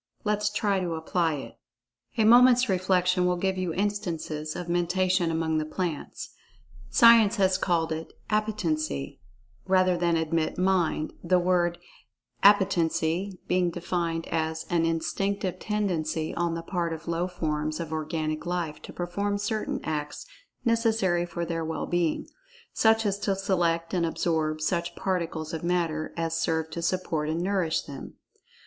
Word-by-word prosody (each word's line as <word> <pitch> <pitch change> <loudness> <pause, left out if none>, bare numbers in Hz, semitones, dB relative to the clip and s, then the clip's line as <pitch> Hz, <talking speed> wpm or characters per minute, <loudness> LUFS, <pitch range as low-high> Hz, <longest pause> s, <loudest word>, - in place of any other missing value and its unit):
Let 210 -1 +1
us 210 0 +1
try 205 -2 0
to 175 -3 -2
apply 160 0 0
it. 140 - -9 0.6
A 220 - +4
moment's 250 +2 +7
reflection 180 -1 +2
will 180 - +2
give 190 +2 0
you 185 -2 -2
instances 165 -6 -2
of 175 - -5
Mentation 175 +1 +1
among 160 -1 0
the - - -1
plants. 160 0 -4 0.6
Science 230 -3 +6
has 190 -3 +3
called 165 -3 +1
it 160 +1 -4 0.2
"Appetency," 165 - -1 0.5
rather 185 -1 +4
than 170 -1 +1
admit 160 0 -1
"Mind," 180 -4 +1
the 180 +1 +3
word 175 -1 +2 0.6
"Appetency" 190 -2 +3
being 180 -1 +2
defined 170 -1 -2
as 160 0 -2
"an 165 -1 +2
instinctive 185 +3 -1
tendency 165 -7 -1
on 170 -1 -1
the 165 - -5
part 170 -1 -2
of 160 +1 -8
low 170 +1 0
forms 155 -3 -2
of 160 -2 -4
organic 155 0 -2
life 175 -4 -3
to - - -9
perform 200 +4 -2
certain 210 +2 -2
acts 150 -1 -4 0.4
necessary 220 -7 +2
for 170 0 -4
their 165 -1 -2
well 160 0 -3
being—such 225 - 0
as 200 -1 0
to 200 -1 0
select 170 -3 0
and 170 -2 +1
absorb 155 -2 -1
such 170 +2 -1
particles 170 -4 -2
of 160 - -4
matter 170 -3 -1
as 165 -1 -1
serve 160 -1 -1
to 170 - -4
support 165 -3 -1
and 160 +2 -1
nourish 185 -4 0
them." 140 -1 -9
175 Hz, 145 wpm, -27 LUFS, 160-190 Hz, 0.6 s, moment's